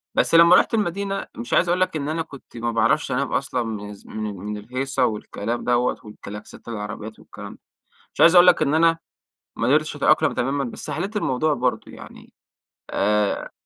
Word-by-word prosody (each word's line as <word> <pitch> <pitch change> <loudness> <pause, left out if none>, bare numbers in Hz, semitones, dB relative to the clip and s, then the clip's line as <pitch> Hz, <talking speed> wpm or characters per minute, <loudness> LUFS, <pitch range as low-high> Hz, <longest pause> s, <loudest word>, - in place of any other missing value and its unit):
بس - - +2
لمّا 170 +2 +8
رُحت - - +3
المدينة 200 -1 -2
مش 115 - -5
عايز 175 - +3
أقول 180 +1 +1
لَك 185 - +1
إن 145 -1 -3
أنا 165 +1 -1
كنت 140 -6 -11
ما 120 0 -2
بعرفش 115 - +1
أنام - - -1
أصلًا 125 - -1
من 105 -2 -6
ز 100 - -16
من 110 -1 -5
مِن 105 +3 -5
الهيصة 130 +4 -1
والكلام 110 +1 -4
دَوَّة 125 0 +1
والكَلاكسات 105 +1 -11
العربيّات 110 0 -6
والكلام - - -11
ده. - - -19 0.5
مش - - -3
عايز 170 +2 +7
أقول 175 0 +8
لَك 175 -3 +5
إن 150 -1 +1
أنا 165 +1 +4 0.6
ما - - -2
اقدرتش - - +2
أتأقلم - - +3
تمامًا 140 +3 -1
بس 120 - -6
حليت 205 +3 -4
الموضوع 150 -2 0
برضو، 125 -1 -2
يعني، - - -13 0.6
آآ 105 0 0
125 Hz, 185 wpm, -22 LUFS, 110-165 Hz, 0.6 s, لمّا